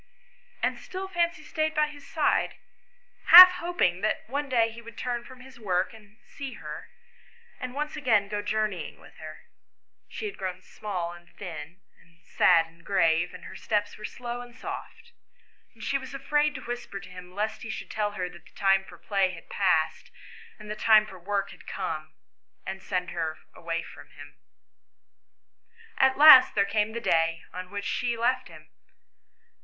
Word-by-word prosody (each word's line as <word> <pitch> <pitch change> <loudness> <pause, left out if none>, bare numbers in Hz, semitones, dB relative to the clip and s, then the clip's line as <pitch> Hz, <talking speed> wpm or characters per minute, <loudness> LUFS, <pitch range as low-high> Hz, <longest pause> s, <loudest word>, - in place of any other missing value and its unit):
And - - 0
still 380 +1 -6
Fancy 340 -4 -1
stayed 310 +1 -2
by 305 0 +3
his 290 -2 -12
side, 315 - +1 0.7
half 365 +2 +12
hoping 265 - 0
that 215 - -1
one 285 +4 -3
day 230 -3 +2
he 230 +1 -11
would 230 -1 -13
turn 240 -1 -3
from 255 +1 -13
his 260 -1 -14
work, 185 -1 -1
and 215 -1 -17
see 275 -2 -8
her, - - -9 0.7
and 255 0 -6
once 300 +1 -3
again 225 -9 +2
go 205 0 -3
journeying 210 -5 -2
with - - -17
her. 155 0 -10 0.7
She - - -6
had 415 - -6
grown 185 -1 -5
small 185 -7 -5
and 175 0 -15
thin, 170 -1 -8 0.2
and 165 +1 -26
sad 165 -2 +4
and 165 +1 -21
grave, 170 -3 +2
and 180 - -11
her - - -10
steps 205 -2 -1
were 215 - -13
slow 240 +2 -6
and 245 0 -12
soft, 470 - -8 0.6
and - - -12
she 275 - 0
was 260 +1 -9
afraid 295 +2 +1
to 260 - -6
whisper 240 -4 -5
to 185 - -13
him 180 0 -12
lest 215 +2 -2
he 225 - -7
should - - -6
tell 210 -1 -1
her 180 -3 -3
that 175 -2 -14
the - - -21
time 195 -1 +3
for - - -14
play 195 -2 0
had 165 - -14
passed 170 -5 +1 0.5
and 215 - -12
the 210 - -4
time 215 -1 +5
for 195 -3 -12
work 200 +2 -2
had - - -16
come, 155 -4 -5 0.5
and 190 +1 -6
send 180 -1 -3
her 160 -2 -3 0.2
from 170 0 -6
him. - - -14 1.6
At 265 0 +4
last 290 -3 +9
there 200 -1 +3
came 210 +2 0
the 235 - -3
day 165 -4 +1
on 180 0 -7
which 200 0 -5
she 240 -1 -1
left 255 +2 0
him. - - -15
210 Hz, 180 wpm, -27 LUFS, 180-255 Hz, 1.6 s, half